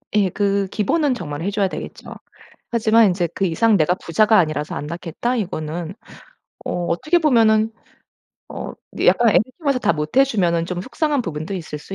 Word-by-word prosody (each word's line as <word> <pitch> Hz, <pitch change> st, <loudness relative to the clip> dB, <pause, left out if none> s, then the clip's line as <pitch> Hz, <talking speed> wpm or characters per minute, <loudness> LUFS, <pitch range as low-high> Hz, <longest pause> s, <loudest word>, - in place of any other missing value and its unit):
예. 200 Hz, -3 st, +3 dB
그 200 Hz, +1 st, 0 dB
기본은 265 Hz, -, 0 dB
정말 150 Hz, -7 st, -6 dB
해줘야 200 Hz, +2 st, 0 dB
되겠죠. -, -, -8 dB, 0.6 s
하지만 225 Hz, -1 st, +4 dB
인제 180 Hz, -2 st, 0 dB
그 195 Hz, -, -1 dB
이상 205 Hz, +5 st, +3 dB
'내가 160 Hz, +2 st, +2 dB
부자가 215 Hz, +5 st, +2 dB
아니라서 155 Hz, -3 st, -1 dB
안 -, -, -4 dB
낳겠다.' 170 Hz, +9 st, -3 dB
이거는 170 Hz, -4 st, -4 dB, 0.7 s
어 175 Hz, -1 st, -2 dB
어떻게 240 Hz, -, +1 dB
보면은 225 Hz, -7 st, +3 dB, 0.8 s
어 -, -, -6 dB, 0.2 s
근데 -, -, -2 dB
약간 235 Hz, -1 st, +5 dB
애들 -, -, +4 dB, 0.2 s
쪽에서 280 Hz, -6 st, 0 dB
다 245 Hz, -, +2 dB
못 150 Hz, +5 st, -5 dB
해주면은 185 Hz, -11 st, +2 dB
좀 180 Hz, 0 st, -4 dB
속상한 290 Hz, -, -1 dB
부분도 160 Hz, 0 st, -5 dB
있을 160 Hz, -4 st, -6 dB
수 195 Hz, -, -9 dB
195 Hz, 350 characters per minute, -20 LUFS, 170-230 Hz, 0.8 s, 약간